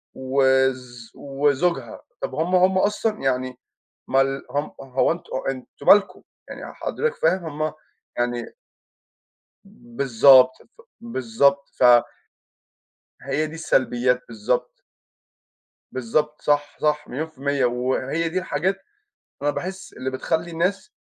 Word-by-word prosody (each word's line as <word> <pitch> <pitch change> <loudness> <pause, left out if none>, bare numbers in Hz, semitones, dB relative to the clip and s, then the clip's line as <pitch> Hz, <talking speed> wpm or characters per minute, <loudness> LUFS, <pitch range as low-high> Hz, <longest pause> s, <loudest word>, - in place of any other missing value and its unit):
وز 130 -2 0
وزوجها. 145 +4 -1 0.2
طَب - - -4
هُم 180 +3 0
هُم 185 +1 +4
أصلًا 210 +2 0
يعني 130 -1 -1 0.5
مال 135 +1 +1
هُم 145 +1 -2
هو 135 -1 +1
أنتم، 170 +1 -6 0.2
أنتم 130 -1 -8
مالكم؟ 205 0 +5 0.3
يعني - - -8
حضرتك 470 +1 -2
فاهم؟ 190 - +1 0.2
هُم 155 - -2 0.4
يعني 120 - -2 1.4
بالضبط 130 0 +6 0.2
ف 465 - -18 0.2
بالضبط 140 - +1
ف - - +2 1.4
هي 140 +4 -1
دي 155 - -9
السلبيات، 125 -5 +1
بالضبط. 115 - -2 1.2
بالضبط، 150 +5 -1
صح، 145 0 0
صح، 150 0 0
مليون 155 +6 -4
في 155 - -30
المِيّة 140 -1 0
وهي 130 +6 -1
دي 185 - -1
الحاجات 185 +3 -2 0.6
أنا 145 - +1
باحس 190 +4 -6
اللي 130 +1 -4
بتخلّي 160 +6 -2
الناس، 185 - -1
140 Hz, 115 wpm, -23 LUFS, 130-170 Hz, 1.4 s, بالضبط